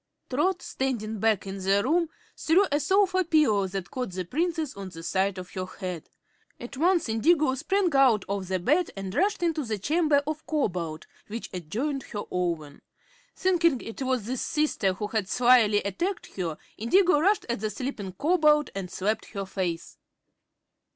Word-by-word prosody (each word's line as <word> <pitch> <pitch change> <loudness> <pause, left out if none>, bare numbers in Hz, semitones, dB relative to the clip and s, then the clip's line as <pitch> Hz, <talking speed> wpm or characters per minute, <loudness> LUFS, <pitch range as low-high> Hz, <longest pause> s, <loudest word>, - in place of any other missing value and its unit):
Trot, 360 +8 +1
standing 225 -5 -3
back 220 -2 +2
in 195 0 -5
the 195 +2 +2
room, 330 +4 +2 0.3
threw 355 +5 +3
a 290 - +2
sofa 375 +2 +3
pillow 300 - +3
that 190 0 -5
caught 250 -4 -3
the 185 0 -3
Princess 320 - -1
on 195 -1 -7
the 165 -2 -10
side 190 +2 0
of 180 -1 -8
her 185 -1 -4
head. 180 -3 -6 0.5
At 240 +3 -8
once 340 +3 +2
Indigo 280 +5 +3
sprang 350 +5 0
out 255 -7 +4
of 195 -2 -3 0.2
bed 330 +5 +3
and 195 -1 -5
rushed 390 - +1
into 325 -3 0
the 220 -4 -2
chamber 300 - +2
of 310 +1 -5
Cobalt, 175 - -2 0.2
which 230 +3 -6
adjoined 230 - -3
her 205 -2 -5
own. 165 -5 -2 0.5
Thinking 340 -7 +2
it 225 +3 -8
was 255 -5 0
this 250 +2 -3
sister 295 -11 0
who 200 +3 -4
had 210 -2 -2
slyly 235 -4 +4
attacked 345 - -3
her, 170 -5 -3 0.2
Indigo 350 - +4
rushed 400 +7 +2
at 235 -2 -2
the 215 +1 -2
sleeping 210 -4 -5
Cobalt 300 - +3
and 195 -2 -5
slapped 210 +4 -1
her 200 -2 -3
face. 180 -3 -4
235 Hz, 165 wpm, -27 LUFS, 195-310 Hz, 0.5 s, out